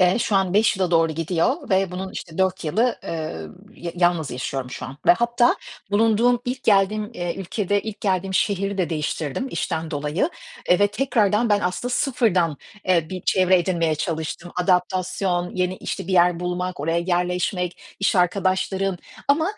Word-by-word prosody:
Eee, 185 +3 +4
şu 215 -3 +1
an 190 -1 +1
5 215 0 +4
yıla 185 -2 0
doğru 165 -1 +3
gidiyor 175 - -1
ve 190 -1 +2
bunun 185 +1 -5
işte 165 -1 -8
4 190 -2 +1
yılı, 225 +10 +1
ııı, 80 - -5 0.2
ya 170 -1 -6
yalnız 175 -4 +1
yaşıyorum 130 0 -4
şu - - -6
an. 130 +2 -9
Ve - - +9
hatta, 235 +4 +2 0.3
bulunduğum, 225 +3 +3
ilk 250 0 -3
geldiğim, 210 +1 +3
eee, 175 -1 -3
ülkede, 195 +1 -1
ilk 215 -2 -7
geldiğim 190 -1 0
şehri 200 0 0
de 175 - 0
değiştirdim 155 - -2
işten 160 0 -3
dolayı, 150 - -1 0.4
eee, 180 - +6
ve 205 - +5
tekrardan 220 -1 +1
ben 205 -1 +3
aslında 195 +7 -2
sıfırdan, 190 - +1 0.3
eee, 170 -4 +3
bir 185 -2 -5
çevre 185 -1 +4
edinmeye 170 -3 +1
çalıştım. 160 +2 -4
Adaptasyon, 180 0 0
yeni, 180 0 0
işte, - - -5
bir 195 - -3
yer 175 -1 +4
bulmak, 180 -1 -3
oraya 165 +3 0
yerleşmek, 180 0 -1 0.2
iş 195 - +2
arkadaşlarım 190 +1 +1 0.3
ama, 290 +3 +4
185 Hz, 165 wpm, -23 LUFS, 170-205 Hz, 0.4 s, Ve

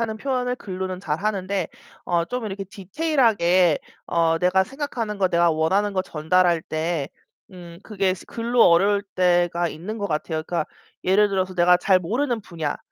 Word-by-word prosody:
하는 220 -1 -2
표현을 250 0 -2
글로는 185 -3 -5
잘하는데, 190 +2 -2 0.4
어 170 -1 +1
좀 250 +3 -4
이렇게 195 -1 -5
디테일하게 195 - +2 0.3
어 165 -1 +1
내가 180 +2 +3
생각하는 235 -5 -4
것, 185 -2 +2
내가 170 0 +3
원하는 190 +6 +1
것 185 -1 0
전달할 170 +1 +1
때 155 -2 -2 0.4
음 175 -2 -11
그게 195 -3 0
스 185 - -10
글로 235 +1 +2
어려울 200 +4 +4
때가 175 -1 +2
있는 180 +9 -6
것 205 -2 -3
같아요. 155 0 -2
그러니까 170 -1 -2 0.4
예를 200 +2 +3
들어서 185 -1 -1
내가 180 0 +4
잘 190 -2 +3
모르는 235 +6 -2
분야. 160 -6 -4
185 Hz, 345 characters per minute, -23 LUFS, 170-210 Hz, 0.4 s, 어려울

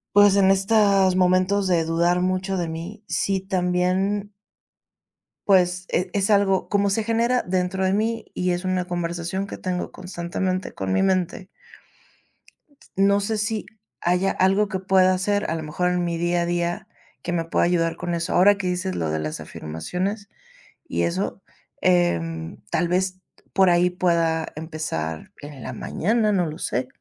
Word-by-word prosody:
pues, 205 -1 +7
en 195 -1 +5
estos 195 -1 +3
momentos 185 +2 +2
de 175 -3 +2
dudar 170 +2 +2
mucho 185 +1 -1
de 175 -2 -1
mí, 170 +7 -7
si 195 -1 0
también 190 +2 0 1.2
pues, 180 -2 +3
e 180 +1 0
es 195 0 0
algo 200 -2 +3
Como 200 0 +1
se 210 +2 0
genera 235 +2 +2
dentro 185 +1 -1
de 190 - +2
mí, 225 +2 -1
y 180 0 0
es 175 +1 -2
una 185 -1 0
conversación 175 +2 -3
que - - -7
tengo 180 -1 -3
constantemente 185 +1 -3
con 95 -1 -3
mi 95 - +2
mente 185 0 0 1.5
no 200 +1 +4
sé 215 +2 -1
si 215 0 -2 0.3
haya 180 +2 +2
algo 195 +3 +2
que 190 -2 -2
pueda 185 0 +4
hacer, 205 +1 0
a - - 0
lo 160 - -4
mejor, 160 +4 -1
en 180 0 0
mi 170 -1 -2
día 175 +1 +1
a - - 0
día, 175 0 -2 0.3
que 175 - -4
me 170 -1 -1
pueda 165 - +1
ayudar 165 -1 +1
con 175 -1 -3
eso. 170 0 -2
Ahora 200 +3 +5
que 195 - -4
dices 185 +1 -2
lo 80 - -1
de 80 - -1
las 75 0 -4
afirmaciones 180 - -4 0.6
y - - -1
eso, 185 +3 -2 0.4
em, 85 - +1
tal 175 - +1
vez, 185 +1 0 0.3
por 190 -2 +4
ahí 175 +1 +4
pueda 170 -3 +1
empezar, 155 - -4
en 145 -4 -9
la - - -5
mañana, 215 +3 0
no 185 -4 +2
lo 155 +1 -6
sé. 125 -6 -2
185 Hz, 165 wpm, -23 LUFS, 170-195 Hz, 1.5 s, pues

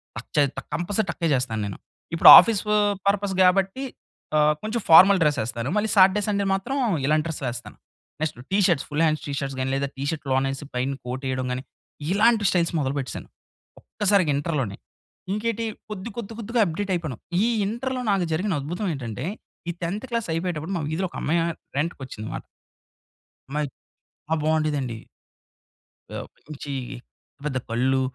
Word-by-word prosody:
టక్ - - -8
చే 150 - +5 0.3
కంపల్సరీ 195 +4 0
టక్కే 165 - -1
జెస్తా 125 -3 0
నేను. 100 -2 -5 0.4
ఇప్పుడు 165 - +8
ఆఫీసు 215 -3 +4 0.4
పర్పస్ 200 -1 +1
గాబట్టి 195 +7 +3 0.5
ఆహ్, 150 0 +5
కొంచెం 220 +1 -2
ఫార్మల్ 185 +4 +9
డ్రెస్ 145 -2 +2
ఏస్తాను. 115 +3 -4
మళ్ళీ 215 +1 +1
సాటర్‌డె, 195 +2 +6
సండే 200 -1 0
మాత్రం 195 +8 -2 0.3
ఇలాంటి 155 +1 +2
డ్రెస్‌లు 150 -5 -4
ఏస్తాను. 120 0 -9 0.4
Next 155 -5 -2 0.2
T shirts 180 -7 +3
full 150 +1 -1
hand 155 -1 +1
T shirts 140 -2 -3
గాని 130 +1 -1
లేదా 140 0 0
టీషర్ట్స్ 145 +1 -3
లోనేసి 135 +1 0
పైన 130 +2 -1
కోటేయడం 130 0 -3
గాని 130 +1 -4 0.5
ఇలాంటి 215 +1 +4
స్టైల్స్ 170 -2 +1
మొదలుపెట్టేసాను. 135 -1 -3 0.5
ఒక్కసారిగా 200 -6 +2
ఇంటర్‌లోనే. 140 - -2 0.6
ఇంకేటి 230 +1 -1 0.3
కొద్ది 210 +3 -5
కొద్ది 225 0 -6
కొద్దిగా 230 +1 0
అప్డేట్ 190 +4 -3
అయిపోయాను. 155 -9 -4 0.2
ఈ - - +3 0.2
ఇంటర్‌లో 255 +3 -3
నాకు 185 -3 +1
జరిగిన 185 +4 0
అద్భుతం 175 +8 -3
ఏంటంటే. 120 0 -5 0.4
ఈ - - -1
10థ్ 200 +8 -3
క్లాస్ 230 -2 -1
అయిపోయేటప్పుడు 170 +1 -3
మా - - -3
వీధిలో 175 +3 -1
ఒక - - -13
అమ్మాయి 165 +3 +2 0.4
రెంటుకోచ్చింది 135 -8 -4
మాట. - - -5 1.1
అమ్మాయి 150 0 -1 0.6
ఆ! - - +4
బాగుండెదండి. 150 -6 0 1.2
ఆహ్, - - -6 0.2
మంచి 145 -2 -6 0.7
పెద్ద 135 -3 -1
కళ్ళు, 130 +3 +1
160 Hz, 145 wpm, -24 LUFS, 135-200 Hz, 1.2 s, ఫార్మల్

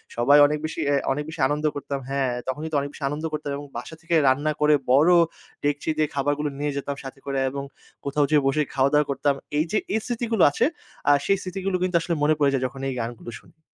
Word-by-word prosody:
সবাই 130 +5 +5
অনেক 150 +1 -2
বেশি 155 - -5
অ্যা 145 - +3 0.2
অনেক 145 +2 -1
বেশি 160 - -9
আনন্দ 150 +2 -2
করতাম 140 -1 -4
হ্যাঁ, 135 -2 0 0.2
তখন 130 +3 -2
কিন্তু 155 -2 -1
অনেক 140 0 -3
বেশি 145 - -10
আনন্দ 150 +2 -4
করতাম 150 -1 -3
এবং 145 - -8
বাসা 125 +7 -7
থেকে 170 0 0
রান্না 145 +4 +2
করে 150 0 +5 0.2
বড় 150 +7 +6 0.5
ডেকচি 145 +2 -1
দিয়ে 155 -1 +2
খাবারগুলো 145 +1 0
নিয়ে 145 0 -1
যেতাম 140 0 -3
সাথে 135 0 -9
করে 135 -1 -1
এবং 140 +1 -5 0.4
কোথাও 145 0 +1
যেয়ে 145 -3 +4
বসে 135 - +1 0.2
খাওয়া-দাওয়া 140 +2 +3
করতাম। 140 +1 +1 0.2
এই 155 - +2
যে, 215 - +2 0.2
এই - - +2
স্মৃতিগুলো 235 -3 0
আছে 230 - +2 0.4
আ - - +8
সেই 195 - +3
স্মৃতিগুলো 190 +1 -3
কিন্তু 185 -1 -1
আসলে 170 0 -1
মনে 155 +1 +4
পড়ে 140 -2 +3
যায় 130 -1 0
যখন 135 +2 -11
এই - - -3
গানগুলো 120 0 -5
শুনি। 160 - -24
145 Hz, 225 wpm, -24 LUFS, 140-155 Hz, 0.5 s, আ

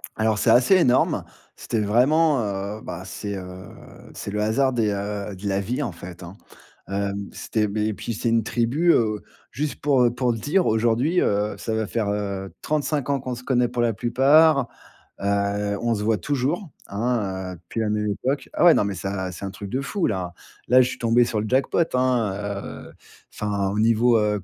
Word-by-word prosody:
Alors 110 -1 +1
c'est 115 - +3
assez 125 +11 +5
énorme. 130 -9 +3 0.3
C'était 115 - -3
vraiment, 140 +8 +3
heu, 100 +1 -4
ben 90 +2 -6
c'est, 100 +1 -5
heu, 90 -1 -8 0.5
c'est - - -6
le 105 +1 -1
hasard 115 +6 +2
des, 115 -3 +1
heu, 100 0 -4
de 100 +2 -6
la 95 0 +1
vie 125 +8 -2
en 120 - -2
fait, 90 +1 -10
hein. 85 +2 -10 0.5
Hem, 100 0 -3
c'était, 105 -2 -1
beh, 105 +1 -1
et 110 - -1
puis 115 - -5
c'est 110 - -3
une 115 -1 +2
tribu, 125 +11 +2
heu, 110 -2 +1 0.3
juste 145 +4 -3
pour, 140 -4 +3
heu, 120 - +4
pour 125 -1 +1
te 115 - -5
dire 175 - +1
aujourd'hui, 120 +10 +2
heu, 105 +1 0
ça 110 - -3
va 110 -1 -1
faire, 110 -2 -1
heu, 100 -2 -3
35 150 -2 -1
ans 140 -1 +1
qu'on 125 -1 -4
se 125 - -10
connaît 125 -2 +2
pour 120 -1 -2
la 115 -1 +2
plupart. 135 +5 +4 0.5
Heu, 100 +1 0
on 120 -1 +1
se 105 - -3
voit 110 0 +2
toujours, 145 - -2 0.2
hein, 100 -4 -2
heu, - - -8
depuis 90 +6 -7
la 110 - 0
même 105 0 0
époque. 135 +7 -2
Ah - - +3
ouais, 170 - +9
non, - - +3
mais 100 -1 -3
ça, 95 0 -3
c'est 90 - -7
un 95 - -4
truc 100 +1 -8
de 130 - -1
fou 190 +6 -1
là. 90 -4 -3 0.3
Là, 130 +2 +6
je 125 - +2
suis - - -6
tombé 120 +1 +4
sur 110 -2 -2
le 110 - -3
jackpot, 130 +6 +1
hein, 125 -5 +1 0.5
heu, - - -12 0.4
enfin, 100 -2 -1
au 105 - -2
niveau, 115 +1 +4
heu, 105 -2 0
110 Hz, 210 wpm, -23 LUFS, 100-125 Hz, 0.5 s, ouais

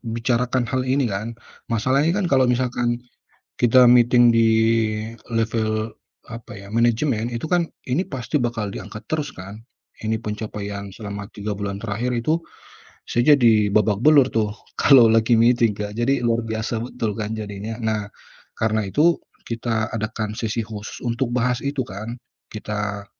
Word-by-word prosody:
bicarakan 120 +1 0
hal 130 0 +1
ini 140 -1 +2
kan, 100 +3 -3 0.5
masalahnya 135 +8 +2
kan 205 - 0
kalau 130 -1 +5
misalkan 120 -1 0 0.7
kita 125 +1 +6
meeting 120 0 +6
di 115 0 +5 0.8
level, 110 -1 -1 0.4
apa 115 -1 -9
ya, 100 - -12
manajemen, 115 +1 +1
itu 115 +3 -4
kan 175 -2 +2 0.2
ini 135 +8 +1
pasti 130 -3 -3
bakal 115 -4 -2
diangkat 105 +2 -8
terus 150 -2 -1
kan, 95 +4 -9 0.4
ini 110 +1 0
pencapaian 105 -2 -5
selama 100 -1 -7
3 105 0 -4
bulan 100 -1 -4
terakhir 115 +3 -2
itu 135 +8 +1 0.7
saya 120 +5 +4
jadi 110 -6 +4
babak 105 -1 +2
belur 145 -4 +6
tuh, 110 -2 0 0.3
kalau 130 -5 +7
lagi 115 +1 +4
meeting 120 -1 +4
Kak, 105 0 -4
jadi 125 +4 +1
luar 115 0 +2
biasa 110 +1 -2
betul 115 -4 -3
kan 110 0 -3
jadinya. 105 +1 -6
Nah, 110 -2 -1 0.5
karena 110 -1 0
itu, 160 - +3 0.3
kita 115 -1 -1
adakan 110 -1 -3
sesi 115 0 -2
khusus 105 -1 -8
untuk 120 +1 -1
bahas 125 0 +1
itu 140 -1 -1
kan, 110 +5 -7 0.4
kita 105 -1 -4
115 Hz, 145 wpm, -22 LUFS, 105-125 Hz, 0.8 s, kalau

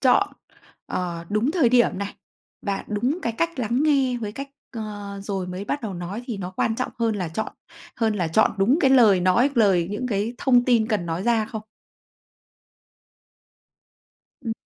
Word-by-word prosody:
chọn, 345 +10 +4 0.6
ờ, 170 -2 -3
đúng 215 +6 +1
thời 310 -8 +3
điểm 240 -6 +3
này, 200 0 -4 0.5
và 200 -1 -2
đúng 245 - 0
cái 230 - -1
cách 335 +4 -2
lắng 240 +4 0
nghe 275 -5 +3
với 210 -1 -4
cách 275 +3 -6 0.3
ờ, 205 -2 -6
rồi 195 -3 -3
mới 180 +2 -5
bắt 285 +5 -3
đầu 200 -4 -4
nói 180 +7 -5
thì 230 -5 -3
nó 185 -2 -5
quan 220 +4 0
trọng 255 - -2
hơn 230 -2 +1
là 180 -4 -2
chọn 190 +7 -4 0.4
hơn 225 -2 +1
là 180 -5 -1
chọn 190 +7 +4
đúng 240 +10 +4
cái 270 - +4
lời 220 -8 +6
nói, 185 +10 +3
lời 190 -7 +3
những 230 +5 -3
cái 215 +1 -1
thông 245 -2 +4
tin 235 -3 +3
cần 210 -7 -1
nói 165 +3 -2
ra 230 -2 +2
không? 220 -1 -6 2.8
Ừm. 225 - -1
220 Hz, 180 wpm, -24 LUFS, 195-250 Hz, 2.8 s, lời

